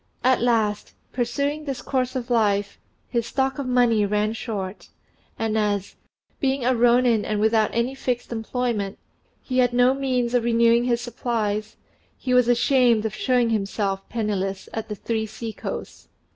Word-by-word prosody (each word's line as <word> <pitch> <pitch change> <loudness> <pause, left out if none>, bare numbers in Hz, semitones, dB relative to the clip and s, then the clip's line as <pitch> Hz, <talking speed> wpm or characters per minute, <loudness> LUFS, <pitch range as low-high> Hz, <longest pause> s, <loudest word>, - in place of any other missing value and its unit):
At 255 -1 +3
last, 220 -4 0 0.2
pursuing 280 +5 -1
this 275 -3 -4
course 255 -1 -1
of 250 -1 -4
life, 205 -3 +1 0.3
his 235 -2 -1
stock 265 0 -1
of 275 - -3
money 245 -4 +3
ran 210 +1 0
short, 205 -4 -5 0.5
and 225 -1 -1
as, 205 -2 -1 0.4
being 270 -2 0
a 255 - +4
rônin 240 -2 +3
and 215 -1 -1
without 220 0 +3
any 235 +3 0
fixed 250 -3 -3
employment, 225 -3 -2 0.5
he 255 -1 -1
had 245 -1 +3
no 250 +1 +4
means 255 -3 -1
of 245 -2 +2
renewing 235 0 +3
his 240 -1 +1
supplies, 220 -3 -2 0.4
he 250 - -2
was 250 -1 +5
ashamed 245 -2 +3
of 220 - -2
showing 245 -1 +1
himself 195 -2 -2
penniless 195 -4 -2
at 220 -1 -4
"The 210 - -3
Three 220 +1 -2
Sea 220 +1 -6
coasts." - - -7
235 Hz, 160 wpm, -24 LUFS, 215-250 Hz, 0.5 s, was